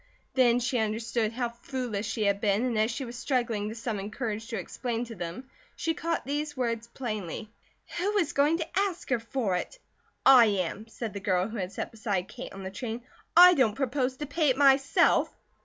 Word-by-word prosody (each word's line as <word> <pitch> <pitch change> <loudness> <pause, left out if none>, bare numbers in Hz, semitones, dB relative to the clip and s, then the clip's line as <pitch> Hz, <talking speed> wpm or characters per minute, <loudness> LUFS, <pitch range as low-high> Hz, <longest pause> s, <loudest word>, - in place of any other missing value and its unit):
Then 245 -2 +4
she 245 0 0
understood 220 +1 -1
how 240 0 -2
foolish 235 -3 -4
she 220 - -1
had 200 0 +1
been 210 +2 +2
and 245 -2 -1
as 215 +1 +3
she 250 +3 -4
was 240 0 -8
struggling 235 -5 -1
to 220 - -6
summon 215 -4 -4
courage 220 -1 -4
to 230 -2 -4
explain 240 -1 -3
to 235 - -8
them 180 +6 -6 0.3
she 325 - -1
caught 330 +1 -2
these 295 +1 -3
words 235 -2 -1
plainly: 215 -4 -5 0.5
"Who 410 +4 +1
is 345 -7 +1
going 295 +4 +3
to 335 +2 -2
ask 375 -7 -2
her 245 - +3
for 230 -3 -2
it?" 340 - -5 0.5
"I 260 -3 +9
am," 200 +1 -2
said 225 -1 -6
the 200 - -4
girl 185 -1 +1
who 225 - -6
had 185 -2 -3
sat - - -5
beside 205 -5 -2
Kate - - -8
on 195 0 -8
the 190 - -5
train. 230 +2 -5 0.3
"I 360 +1 +10
don't 245 -9 +2
propose 260 -1 -1
to 295 - -4
pay 295 +1 +1
it 260 - +2
myself!" 275 0 +4
235 Hz, 205 wpm, -28 LUFS, 215-270 Hz, 0.5 s, I